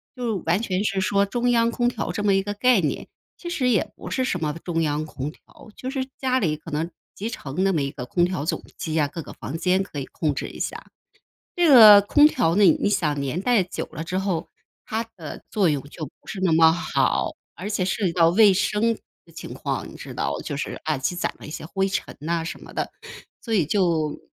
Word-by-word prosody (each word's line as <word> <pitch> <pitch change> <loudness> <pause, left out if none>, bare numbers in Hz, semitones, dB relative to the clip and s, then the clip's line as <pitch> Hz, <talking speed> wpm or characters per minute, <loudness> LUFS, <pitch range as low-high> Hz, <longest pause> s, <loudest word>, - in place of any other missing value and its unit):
就 240 -5 -2
完 - - +3
全 190 -2 -1
是 195 -2 0
说 200 +1 +2
中 245 +3 0
央 230 -1 +3
空 240 +1 0
调 245 - -2
这 210 - -3
么 205 -1 +3
一 195 - +3
个 205 +1 -4
概 245 -1 +4
念。 150 - -2 0.3
其 345 - -9
实 265 -7 0
也 220 -6 +1
不 - - -9
是 260 - 0
什 180 -8 -1
么 150 -2 -1
中 165 -2 -1
央 150 -1 0
空 145 -1 -5
调， 195 - -18
就 260 - -5
是 265 -2 -2
家 260 -1 +1
里 160 -8 +1
可 155 - -11
能 160 +3 -2 0.2
集 215 +3 -4
成 155 - -3
那 195 - +3
么 155 - +1
一 140 - -1
个 135 -3 -7
空 175 +7 +2
调 180 -5 -2
总 - - -1 0.2
机 160 -1 -2
啊， 150 - +3
各 165 +4 -7
个 - - -10
房 150 - -6
间 185 +3 +2
可 190 -6 -7
以 135 - -4
控 150 -1 -2
制 - - -3
一 - - -11
下。 - - -5 0.6
这 350 -2 +3
个 215 -7 +10
空 290 +8 +6
调 165 - +1
呢， 205 - +4
你 195 - +4
想 160 -8 0
年 140 +5 -2
代 235 -2 +3
久 180 - -5
了 160 0 -5
之 185 +3 -2
后， 190 -4 -2 0.4
它 220 +1 -2
的 155 -3 -8
作 200 -4 +2
用 145 -3 0
就 155 +1 -6
不 140 - -18
是 200 - -5
那 185 -3 +3
么 160 0 +7
好。 170 0 0 0.2
而 185 - -6
且 205 -3 0
涉 195 +2 -1
及 170 - 0
到 165 -1 +5
卫 200 +3 +6
生 210 +4 +1 0.3
的 - - -20
情 - - -7
况， - - -3
你 - - -13
知 - - -9
道， - - -2
就 145 - -5
是 - - -4
啊 155 -2 0
积 135 +7 -1
攒 180 - -2
了 - - -10
一 - - -8
些 155 - -6
灰 195 +4 0
尘 195 - -3
呐 165 +2 -1
什 165 - -6
么 - - -12
的。 - - -3 0.5
所 230 - -4
以 180 -7 +3
就 165 -4 +1
185 Hz, 260 characters per minute, -24 LUFS, 160-210 Hz, 0.6 s, 个